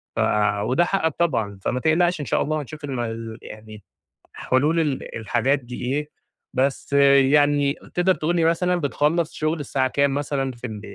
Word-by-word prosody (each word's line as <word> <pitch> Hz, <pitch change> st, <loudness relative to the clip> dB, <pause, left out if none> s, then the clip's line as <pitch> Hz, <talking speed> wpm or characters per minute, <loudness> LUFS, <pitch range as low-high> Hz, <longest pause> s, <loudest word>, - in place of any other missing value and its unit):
ف -, -, -3 dB
آآ، 105 Hz, -1 st, +1 dB
وده 130 Hz, +11 st, +2 dB
حقّك 165 Hz, -5 st, 0 dB
طبعًا، 115 Hz, -, 0 dB
فما 125 Hz, -, -1 dB
تقلقْش 170 Hz, +4 st, +2 dB
إن -, -, -4 dB
شاء -, -, 0 dB
الله 155 Hz, 0 st, -1 dB
هنشوف 150 Hz, +2 st, -10 dB
ال 145 Hz, -, -5 dB
ما 115 Hz, -2 st, -4 dB
يعني 110 Hz, -1 st, -11 dB, 0.5 s
حلول 150 Hz, +6 st, +1 dB
ال 150 Hz, -5 st, -2 dB
الحاجات 120 Hz, +5 st, 0 dB
دي 125 Hz, -1 st, -9 dB
إيه، 145 Hz, +4 st, -2 dB, 0.4 s
بس 135 Hz, +1 st, -1 dB
يعني 140 Hz, +1 st, +4 dB, 0.2 s
تقدر 180 Hz, +1 st, +3 dB
تقول 165 Hz, +3 st, -1 dB
لي 165 Hz, -2 st, +2 dB
مثلًا 180 Hz, +2 st, +2 dB
بتخلّص 155 Hz, +1 st, 0 dB
شغل 155 Hz, +1 st, -1 dB
الساعة 130 Hz, -2 st, 0 dB
كام 140 Hz, +1 st, +1 dB
مثلًا 140 Hz, -1 st, -2 dB
في 125 Hz, 0 st, -8 dB
ال 105 Hz, -2 st, -7 dB
140 Hz, 175 wpm, -23 LUFS, 125-155 Hz, 0.5 s, يعني